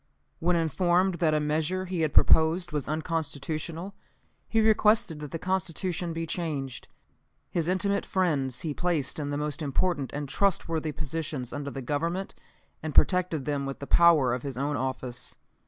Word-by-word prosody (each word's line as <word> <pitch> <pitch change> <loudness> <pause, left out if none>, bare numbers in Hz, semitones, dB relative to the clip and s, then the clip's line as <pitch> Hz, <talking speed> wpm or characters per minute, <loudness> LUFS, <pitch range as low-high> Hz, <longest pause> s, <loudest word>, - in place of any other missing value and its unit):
When 175 +2 +2
informed 175 +2 +2
that 155 -3 +3
a - - +3
measure 155 +5 0
he 180 -2 -2
had 155 -2 +1
proposed 160 +4 +4
was 150 -3 -2
unconstitutional, 160 +3 -3 0.6
he 225 - +2
requested 215 -6 +3
that 150 -1 -6
the 165 - -4
constitution 180 -1 -2
be 165 0 -3
changed. 140 -8 -4 0.6
His 170 -2 0
intimate 200 +2 +1
friends 140 -9 0
he 155 -3 -2
placed 160 -5 -1
in 145 -1 -3
the 145 - -2
most 150 +1 -3
important 145 0 0
and 145 0 -4
trustworthy 165 -3 0
positions 150 -3 -4
under 145 0 -4
the 135 -1 -6
Government, 170 +8 -2 0.5
and 155 -2 -5
protected 180 -6 +3
them 140 -2 -1
with 135 - -4
the 140 - -7
power 155 -7 +5
of 125 - -2
his 135 -1 -5
own 145 +2 -1
office. 130 -2 -4
160 Hz, 160 wpm, -28 LUFS, 145-175 Hz, 0.6 s, power